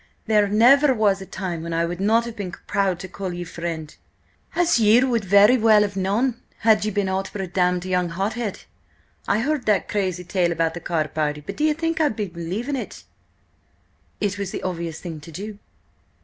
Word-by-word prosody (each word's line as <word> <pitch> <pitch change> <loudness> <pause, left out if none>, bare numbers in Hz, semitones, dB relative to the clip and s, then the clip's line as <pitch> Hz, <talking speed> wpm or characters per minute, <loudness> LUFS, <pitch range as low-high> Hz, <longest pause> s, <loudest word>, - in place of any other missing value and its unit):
"There 210 -2 +3
never 260 +7 +5
was 205 -3 +2
a 190 - -8
time 180 -4 -4
when 165 0 -5
I 165 0 +1
would 175 +2 -4
not 225 +3 +3
have 235 -1 -7
been 190 -4 -5
proud 195 -3 0
to 190 - -6
call 190 0 -5
ye 175 0 -5
friend, 165 -3 -6 0.6
as 345 -7 +3
ye 225 +3 +5
would 240 -4 +1
very 200 +6 +5
well 215 -1 +5
have 200 -1 -3
known, 225 +6 0 0.2
had 220 -2 +4
ye 215 - 0
been 205 -1 -1
aught 190 +1 -2
but 195 - -4
a - - -2
damned 180 0 0
young 180 -1 0
hothead! 205 +5 -3 0.7
I 215 - +2
heard 285 -1 -1
that 210 -2 +2
crazy 185 -3 -2
tale 175 -1 0
about 165 -1 0
the 175 - -6
card 160 -3 -2
party, 150 -1 -1
but 145 - -8
do 300 - +1
ye 310 - +3
think 330 +1 -1
I 300 - +4
believed 200 +2 -4
it?" 265 - -6 1.2
"It 205 -1 -1
was 200 -2 -3
the - - -6
obvious 170 -3 -4
thing 165 -4 -7
to 160 +3 -12
do." 205 +5 -7
195 Hz, 205 wpm, -23 LUFS, 175-220 Hz, 1.2 s, never